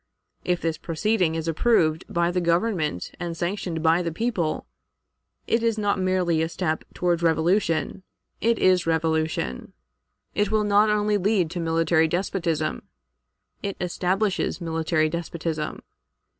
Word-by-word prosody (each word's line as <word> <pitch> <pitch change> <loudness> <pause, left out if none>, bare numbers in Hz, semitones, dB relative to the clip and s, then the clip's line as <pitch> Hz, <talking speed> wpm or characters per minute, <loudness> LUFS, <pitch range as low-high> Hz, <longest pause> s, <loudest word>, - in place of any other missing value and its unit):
If 180 -1 0
this 165 -1 -2
proceeding 175 0 0
is 165 0 -3
approved 160 -2 +2
by 170 0 +1
the 180 0 0
Government 170 - 0
and 170 -2 -4
sanctioned 175 -2 -3
by 165 +2 +4
the 170 -1 -2
people, 180 -4 -1 0.8
it 230 - +1
is 230 -1 +1
not 205 -2 0
merely 185 -3 +1
a 160 - 0
step 160 -2 -2
toward 175 -1 +1
revolution, 165 +1 +1 0.4
it 230 0 +2
is 185 -2 +3
revolution; 160 - -1 0.6
it 205 -1 +1
will 215 0 +2
not 210 +1 +4
only 210 0 +2
lead 190 -4 +1
to 175 - -4
military 165 0 +2
despotism, 170 - -1 0.8
it 200 -1 -4
establishes 185 +3 0
military 160 -2 0
despotism. 165 -1 -4
170 Hz, 130 wpm, -24 LUFS, 160-195 Hz, 0.8 s, by